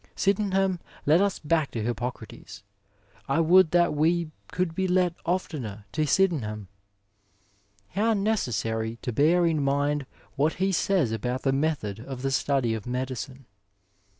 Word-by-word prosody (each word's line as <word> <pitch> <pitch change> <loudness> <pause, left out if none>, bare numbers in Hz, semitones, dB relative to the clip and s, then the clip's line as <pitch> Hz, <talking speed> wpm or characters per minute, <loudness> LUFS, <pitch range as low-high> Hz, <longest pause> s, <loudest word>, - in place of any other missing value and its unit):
*' - - -40
Sydenham 195 -2 +1 0.3
led 155 +5 +5
us 200 -2 +1
back 155 -1 0
to 115 - -4
Hippo 120 +1 -1
crates, 125 - -12 0.7
I 135 - +2
would 175 +1 +6
that 175 0 +3
we 160 +2 +1 0.2
could 180 -1 -1
be 190 +2 -1
led 180 -1 +2
oftener 130 - -3
to 155 +8 0
Sydenham! 120 - 0 1.2
How 220 +4 +1
necessary 115 - -1
to 125 - -3
bear 165 +7 +4
in 160 -3 +1
mind 145 0 0 0.3
what 150 +3 +2
he 190 +1 0
says 180 - +1
about 125 +3 -3
the 135 - +2
method 135 -8 -1
of 130 +2 -7
the 135 - 0
study 135 -3 +1
of 110 -1 -5
medicine. 130 +1 -4
150 Hz, 150 wpm, -26 LUFS, 125-180 Hz, 1.2 s, would